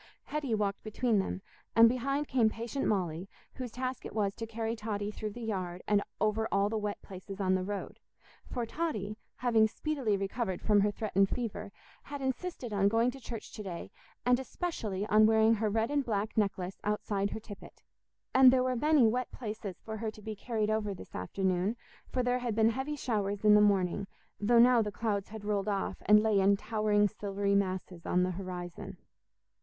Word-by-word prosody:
Hetty 285 -6 -2
walked 200 -2 -1
between 220 0 +1
them, 190 0 -3 0.3
and 230 0 +9
behind 275 +4 0
came 240 -4 +3
patient 230 +4 -3
Molly, 180 -2 -1 0.2
whose 255 -2 -5
task 255 +1 -4
it - - -8
was 200 -2 +1
to 225 - -5
carry 225 0 -3
Totty 210 -2 -3
through 215 0 -4
the 240 - -7
yard 185 -5 -3
and 205 -1 +3 0.2
over 215 +1 +1
all 200 +1 +2
the 220 - -1
wet 210 -1 -3
places 195 +1 -9
on 185 -1 +2
the 185 - +2
road; 200 +1 -5 0.5
for 240 -2 -2
Totty, 220 - -3 0.2
having 225 -3 +3
speedily 255 -3 -1
recovered 195 -1 -2
from 205 -1 +3
her 205 - +3
threatened 195 -2 +1
fever, 210 -4 -4 0.3
had 285 0 -7
insisted 265 -2 -3
on 200 -1 +3
going 230 +4 +3
to 270 - -11
church 230 -3 -7
to - - -6
day, 185 -4 -6 0.3
and 250 0 +4
especially 230 - -3
on 215 0 +5
wearing 220 0 +5
her 220 -1 0
red 225 +4 0
and 290 -1 +2
black 215 -3 -2
necklace 195 -3 -1
outside 205 -1 -1
her - - -5
tippet. 210 -2 -12 0.5
And 260 -1 +8
there 255 0 +3
were 255 0 0
many 295 0 +4
wet 245 +3 +1
places 210 -5 -6
for 220 0 -5
her 220 0 -2
to 215 0 -11
be 220 0 -5
carried 215 0 -1
over 210 -2 -1
this - - -12
afternoon, 185 - -1 0.3
for 255 - 0
there 245 0 +1
had 240 -3 -2
been 220 0 +4
heavy 265 +5 -3
showers 205 -6 -2
in 210 - +8
the 210 - +7
morning, 195 -1 +2 0.3
though 235 +4 +3
now 240 0 +7
the 210 -1 -2
clouds 205 -3 -2
had 215 -1 -8
rolled 205 -1 0
off 200 -1 -2
and 210 0 +7
lay 215 -2 +3
in 200 +1 +4
towering 215 -1 +2
silvery 200 -1 -2
masses 185 -3 -1
on 180 0 +3
the 185 - 0
horizon. 180 -1 -6
215 Hz, 195 wpm, -31 LUFS, 200-235 Hz, 0.5 s, and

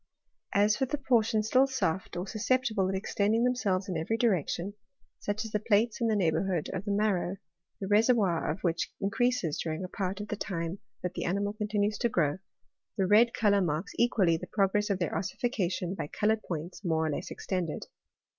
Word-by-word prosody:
As 205 +1 +4
for 265 - 0
the 295 - -1
portions 225 -5 +2
still 260 +5 +4
soft, 190 -10 -2
or 175 - -2
susceptible 215 -2 +1
of 190 - -1
extending 205 +4 +1
themselves 205 -6 +1
in 185 - -3
every 165 +8 -1
direction, 195 - 0 0.5
such 205 +2 -2
as 220 - -7
the 210 - +1
plates 215 +3 +2
in 230 - +3
the 220 - +2
neighbourhood 180 -2 0
of 190 +1 -4
the 205 - -1
mar 210 +1 +2
row, 180 +1 -2 0.4
the 195 - -3
reservoir 210 -4 +3
of - - -3
which 170 -2 -1
increases 205 - 0
during 160 +2 -3
a - - -3
part 190 +1 -3
of 210 - -6
the - - -1
time 175 -2 -3 0.2
that 180 0 -2
the - - -3
animal 200 +3 0
continues 210 -1 -1
to 240 - +2
grow, 160 -5 +1 0.6
the 195 - +2
red 220 +5 +5
colour 200 -2 +3
marks 165 +2 -1
equally 195 -8 +3
the - - -8
progress 205 +1 +1
of 200 - +1
their 175 -4 -2
ossification 190 -4 -1
by 165 -6 -4
coloured 215 +6 +1
points 170 +2 -6
more 160 -3 +1
or 155 - 0
less - - -4
extended. 180 -5 -3
200 Hz, 195 wpm, -29 LUFS, 180-220 Hz, 0.6 s, red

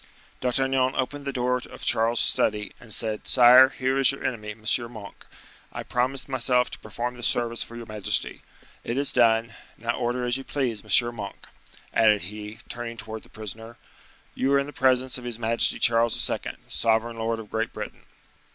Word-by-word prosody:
D'Artagnan 130 +1 +1
opened 140 +2 -3
the 140 - -2
door 125 -1 0
of 125 - -9
Charles's 115 +1 +3
study, 105 -1 +1
and 115 - -15
said, 110 0 +1
"Sire, 125 +2 +8
here 130 0 -1
is 135 - +5
your 135 - -8
enemy, 115 -5 -3
M. 110 +1 -9 0.3
Monk; 105 -4 -11 0.5
I - - -6
promised 130 +2 -1
myself 125 -1 +1
to - - -8
perform 120 +3 -5
this 120 - -1
service 115 -1 0
for 115 - -6
your 120 0 -7
majesty. 105 -2 -1 0.4
It 120 - -3
is 140 0 +2
done; 115 -1 +3 0.2
now 115 +1 -1
order 125 0 -1
as 120 +1 +1
you 135 - -7
please. 125 -7 -2
M. 120 +3 +2
Monk," 100 -3 -8 0.5
added 105 -2 +4
he, 105 +3 -7
turning 120 -1 -6
towards 110 0 -7
the - - -20
prisoner, 115 +2 -8 0.6
"you 135 - 0
are - - +6
in 140 - +1
the 145 - -9
presence 130 -1 +2
of - - -12
his 120 -2 -4
majesty 115 0 +2
Charles 115 0 +2
II., - - -1 0.3
sovereign 115 +1 0
lord 115 0 -1
of 110 -2 -10
Great 115 0 -1
Britain." - - -7
120 Hz, 185 wpm, -25 LUFS, 110-130 Hz, 0.6 s, Sire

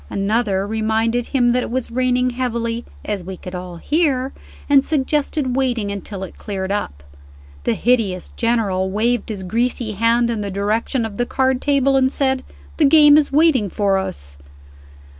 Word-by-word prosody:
Another 200 -1 0
reminded 220 +2 0
him 245 -3 +2
that 250 +1 +2
it - - -4
was 250 0 -3
raining 250 0 +1
heavily 235 -2 -2 0.2
(as 205 -3 -3
we 185 +1 -7
could 180 - -9
all 180 -1 -6
hear), 275 - 0 0.3
and 280 -2 +5
suggested 290 -2 -1
waiting 245 -6 0
until 200 0 -6
it 190 - -10
cleared 195 -2 -4
up. 70 - -3 0.6
The - - +1
hideous 215 -7 0
General 210 -6 0
waved 230 +4 0
his 200 -3 -5
greasy 230 +3 -1
hand 230 +3 +2
in 225 -2 -2
the 200 - -3
direction 215 +5 -1
of 205 -2 -7
the 245 - -1
card 260 -1 +1
table, 275 -1 +2
and 260 0 +3
said, 265 -2 0 0.3
"The 310 - +4
game 295 0 +7
is 295 -2 +3
waiting 280 -8 +3
for 195 0 +1
us." 70 - -7
235 Hz, 165 wpm, -20 LUFS, 200-260 Hz, 0.6 s, game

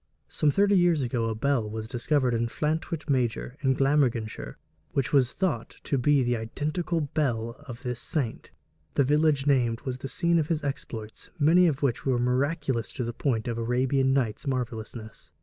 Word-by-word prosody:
' - - -47
Some 150 - +1
thirty 200 +6 +3
years 175 -5 +3
ago 120 -2 -1
a 110 -1 -1
bell 120 -2 0
was 110 0 -5
discovered 125 +1 +1
at 115 - +1
Llantwit 155 +7 -2
Major, 125 -2 0
in 130 -2 +2
Glamorganshire, 120 - 0 0.4
which 135 0 -1
was 130 -3 +4
thought 170 -12 -2
to 140 - 0
be 140 +1 +3
the 120 0 +1
identical 155 +9 -2
bell 130 -6 -1 0.2
of 120 0 -8
this 125 -2 -3
saint. 130 -6 -3 0.5
The 140 - +4
village 150 0 +2
named 120 -5 +2
was 130 -1 -4
the 135 - -5
scene 170 +5 +2
of 150 - 0
his 160 -2 -1
exploits, 115 -6 -5
many 170 +4 +5
of 145 -3 -1
which 130 -4 0
were 130 -2 +1
miraculous 130 0 0
to 130 - -3
the 120 0 -3
point 115 -3 -1
of 115 -1 -2
Arabian 130 +3 +1
Nights 130 -3 0
marvelousness. 115 -3 -5
130 Hz, 180 wpm, -27 LUFS, 120-150 Hz, 0.5 s, many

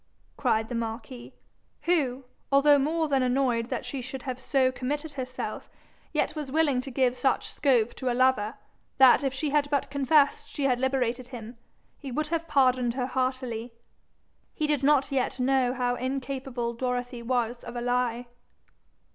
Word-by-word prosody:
cried 220 -4 +1
the 245 - -6
marquis, 230 +2 -5 0.5
who, 275 -7 +1 0.3
although 285 +1 +6
more 315 +3 +1
than 275 -2 +2
annoyed 250 -2 +1
that - - -3
she 275 - -4
should 260 +1 -7
have 255 -2 -4
so 260 -1 +2
committed 290 +4 -4
herself, 255 -2 -5 0.4
yet - - 0
was 295 -3 -5
willing 290 -4 +2
to 270 - -7
give 255 -1 +1
such 255 +1 0
scope 245 -6 +2
to 260 -2 -2
a - - -1
lover, 255 -3 +2 0.4
that 265 0 +7
if 270 - +1
she 275 +2 -2
had 290 -1 +2
but 280 -1 -1
confessed 280 +1 +3
she 285 - -4
had 255 -3 +2
liberated 255 -2 0
him, 240 -2 -9 0.4
he 275 -3 -7
would 305 +4 -2
have 330 0 -2
pardoned 255 -4 +2
her 255 -2 -1
heartily. 255 -3 -2 0.8
He 305 - 0
did 295 -3 +1
not 280 -1 +3
yet 260 -1 -1
know 255 -1 +2
how 250 -1 0
incapable 260 -1 -3
Dorothy 245 0 -3
was 240 0 -1
of 240 - -8
a 240 - -3
lie. 245 0 0
260 Hz, 165 wpm, -27 LUFS, 245-275 Hz, 0.8 s, that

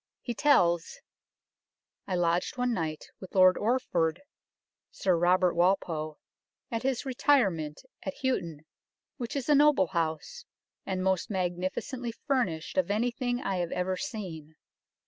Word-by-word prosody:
He 240 - -3
tells 175 - +3 0.6
" - - -56
I 185 - -1
lodged 175 +5 0
one 250 -1 +1
night 160 -5 -3
with 190 - -11
Lord 185 -1 +7
Orford 190 - 0 0.7
[Sir 185 -2 +1
Robert 180 +1 +3
Walpole] 170 -4 0 0.5
at 230 -1 -1
his 265 0 -1
retirement 205 - +1 0.2
at 190 - -5
Houghton, 170 - -1 0.5
which 245 +2 -5
is 275 -3 -2
a 300 - +5
noble 290 - +5
House, 170 - -2 0.4
and 185 -1 -1
most 190 +3 +1
magnificently 190 +6 -3
furnished 250 - 0
of 275 - 0
any 225 +4 +1
thing 245 +1 -2
I 195 -1 -1
have 175 -1 -2
ever 185 +1 -1
seen. 170 - -6
190 Hz, 135 wpm, -29 LUFS, 170-245 Hz, 0.7 s, Lord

